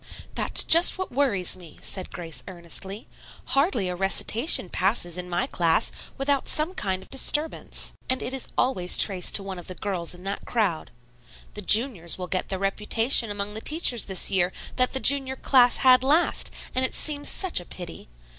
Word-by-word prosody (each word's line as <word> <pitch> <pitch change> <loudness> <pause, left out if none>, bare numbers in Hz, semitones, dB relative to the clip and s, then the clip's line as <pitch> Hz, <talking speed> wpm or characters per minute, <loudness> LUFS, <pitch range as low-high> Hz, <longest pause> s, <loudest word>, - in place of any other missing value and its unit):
"That's - - +1
just 335 +3 +6
what 375 - -5
worries 240 -11 +1
me," 175 -4 -15
said 185 - -4
Grace 165 -3 -6
earnestly. 190 +3 -7 0.4
"Hardly 275 - +1
a 180 - -3
recitation 195 - +2
passes 180 -2 0
in 180 0 -6
my 175 0 -1
class 170 +4 0 0.3
without 275 0 -1
some 310 +4 +1
kind 190 - -3
of - - -19
disturbance, 295 +3 -1 0.2
and 260 -1 +1
it 255 - -4
is 265 - -4
always 185 -9 +2
traced 185 -4 +2
to 200 - +3
one 190 -2 -7
of 175 - -12
the 185 - -6
girls 180 -4 -4
in 180 - -15
that 195 +1 -5
crowd. 205 -9 -2 0.6
The 210 - -5
juniors 205 - +3
will 185 - -5
get 185 0 -4
the 190 - -3
reputation 215 +5 +1
among 205 0 -4
the 220 - -7
teachers 300 -7 +1
this 190 -2 -2
year 180 -2 +2 0.2
that 255 -1 0
the 265 - +1
junior 270 -1 +3
class 250 -2 +3
had 255 -1 +4
last, 300 +6 +2 0.2
and 255 - 0
it 260 - 0
seems 290 -2 +3
such 375 - +1
a 175 - -11
pity. 175 -1 -10
205 Hz, 185 wpm, -24 LUFS, 180-265 Hz, 0.6 s, just